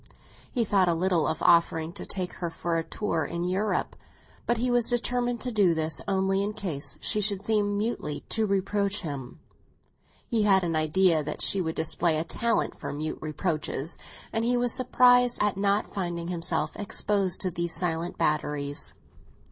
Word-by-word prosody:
He 235 -2 0
thought 195 -3 +3
a 170 - +2
little 175 -2 +1
of 160 - -2
offering 165 -1 +3
to - - -7
take 185 -2 -2
her 170 - -1
for 165 +1 -3
a - - -2
tour 165 -4 -2
in 170 +4 -3
Europe; 190 +4 -1 0.5
but 240 - +2
he 245 +2 0
was 240 -1 +2
determined 245 0 0
to 250 - -2
do 195 -6 +3
this 160 -1 0
only 195 0 +1
in 205 +1 -2
case 175 -9 -4
she 210 - 0
should 200 -1 0
seem 205 -1 +1
mutely 205 -9 -2
to 220 -1 0
reproach 200 +1 0
him. 140 -7 -6 0.9
He 230 -3 +1
had 195 -3 +4
an 165 -2 -1
idea 155 +1 +3
that 150 +1 -3
she 195 - +3
would 160 -2 -3
display 160 0 +1
a 155 - 0
talent 230 +6 -1
for - - -5
mute 155 +2 -4
reproaches, 155 -1 -2 0.3
and 225 - 0
he 245 +1 +2
was 245 -1 +1
surprised 245 -1 +4
at 210 -1 +2
not 200 +1 0
finding 175 -3 -3
himself 170 -1 -1
exposed 200 -2 +1
to 185 - 0
these 170 -1 -2
silent 170 -1 -2
batteries. 145 -1 -1
190 Hz, 175 wpm, -27 LUFS, 165-210 Hz, 0.9 s, had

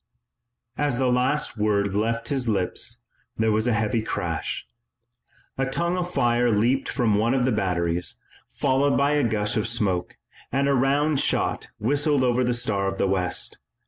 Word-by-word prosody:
As 145 -4 +1
the 130 -1 +2
last 125 0 0
word 100 -2 +1
left 115 +3 -1
his 130 -4 0
lips 110 +4 -1 0.3
there 110 0 +2
was 110 +2 +1
a 120 - +2
heavy 110 +1 0
crash. 90 -7 -3 0.9
A 135 - +1
tongue 170 +6 -1
of 180 -1 -3
fire 120 -4 +2
leaped 120 +5 +1
from 120 -5 +1
one 115 +4 +2
of 125 -2 +2
the 130 - +2
batteries, 90 -4 -1 0.4
followed 140 +1 +1
by 140 +1 +2
a 150 -1 +2
gush 105 -2 0
of 110 - 0
smoke, 105 -7 -1 0.3
and 140 +1 +1
a 140 - +3
round 140 +3 +2
shot - - 0
whistled 145 +4 +2
over 125 0 +2
the 125 - +1
Star 105 -5 -1
of 95 - -3
the - - +1
West. 90 -2 -1
120 Hz, 170 wpm, -24 LUFS, 105-135 Hz, 0.9 s, a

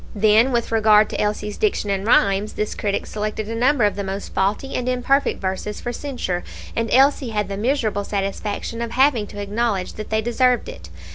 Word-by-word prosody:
Then, 215 +4 +4
with 235 -2 -1
regard 215 -1 +5
to - - -2
Elsie's 210 0 -2
diction 400 - 0
and 195 +1 -2
rhymes, 200 -2 +3
this 210 - -2
critic 200 -1 -2
selected 215 0 -4
a 225 - -4
number 250 +2 +2
of 205 - +2
the 200 - -3
most 195 +1 -5
faulty 205 +8 -1
and 250 0 -1
imperfect 255 +3 +1
verses 190 +2 -3
for 240 - -4
censure, 240 -11 -3 0.3
and 230 -1 -1
Elsie 270 -1 +4
had 210 -2 -2
the 200 - -3
miserable 220 -2 0
satisfaction 205 +3 -3
of 235 - -2
having 260 -5 +3
to 205 - -9
acknowledge 205 -1 -1
that 215 - -7
they 220 0 0
deserved 245 +1 +2
it. 85 +1 -10
215 Hz, 195 wpm, -21 LUFS, 205-240 Hz, 0.3 s, regard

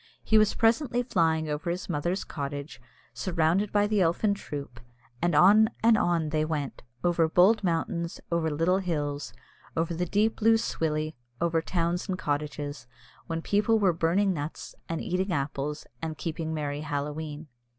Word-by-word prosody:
He 220 - +4
was 215 -1 +3
presently 240 +2 +2
flying 160 -8 +1
over 150 +3 -3
his 180 +2 -3
mother's 175 +4 -1
cottage, 140 -2 -6 0.3
surrounded 170 - +1
by 205 0 +3
the 210 -1 +1
elfin 180 +5 +2
troop, 140 - -7 0.4
and 175 -2 +2
on 210 +6 +7
and 230 0 +6
on 170 -6 +1
they 155 0 +1
went, 150 -3 -3 0.2
over 170 -2 +2
bold 195 +6 +5
mountains, 170 -1 -1
over 170 -1 +1
little 165 +5 +2
hills, 145 -6 -2 0.5
over 165 +1 0
the 175 +2 -2
deep 215 +5 +1
Lough 225 +1 +6
Swilley, 155 -7 -1 0.3
over 165 -1 +1
towns 175 +1 -1
and 185 - -1
cottages, 145 -3 -3 0.4
when 165 -1 -3
people 210 +2 +2
were 195 -5 +3
burning 175 +4 +2
nuts, 150 -1 -6 0.2
and 165 -1 -2
eating 185 +2 -1
apples, 145 0 -2 0.2
and 160 -2 -4
keeping 160 -1 -3
merry 145 -2 -3
Halloween. 150 +1 -4
165 Hz, 155 wpm, -28 LUFS, 150-190 Hz, 0.5 s, on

